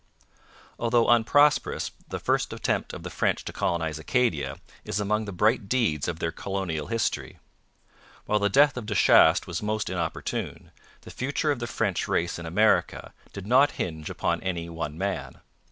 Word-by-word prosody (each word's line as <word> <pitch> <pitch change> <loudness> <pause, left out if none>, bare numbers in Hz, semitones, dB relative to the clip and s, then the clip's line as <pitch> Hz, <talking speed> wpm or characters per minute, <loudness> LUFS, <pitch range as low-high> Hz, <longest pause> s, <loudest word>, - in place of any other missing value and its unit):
Although 115 0 +2
unprosperous, 145 +6 +3 0.2
the - - -4
first - - 0
attempt - - -1
of - - -8
the - - -6
French - - 0
to - - -6
colonize 80 -2 -1
Acadia 90 - 0 0.3
is 100 - -3
among 105 +1 0
the 100 - -6
bright 105 +2 +1
deeds 110 - +1
of 85 - -3
their 80 0 -2
colonial 90 -7 -4
history. 115 -1 -2 0.9
While 105 - +1
the 100 0 +1
death 140 +5 +4
of 115 -4 -5
De 105 - -2
Chastes 80 -1 +5
was 85 -2 -4
most 105 -1 -2
inopportune, 85 -3 -4 0.3
the - - -11
future 140 +3 -1
of 140 - -2
the 120 - -4
French 100 -6 -1
race 85 0 -1
in 85 - -7
America 105 +6 +1 0.2
did 100 -1 -8
not 130 +6 +4
hinge 80 -3 -4
upon - - -1
any 85 -3 -3
one 80 -2 -5
man. 100 +1 -3
100 Hz, 170 wpm, -26 LUFS, 85-115 Hz, 0.9 s, Chastes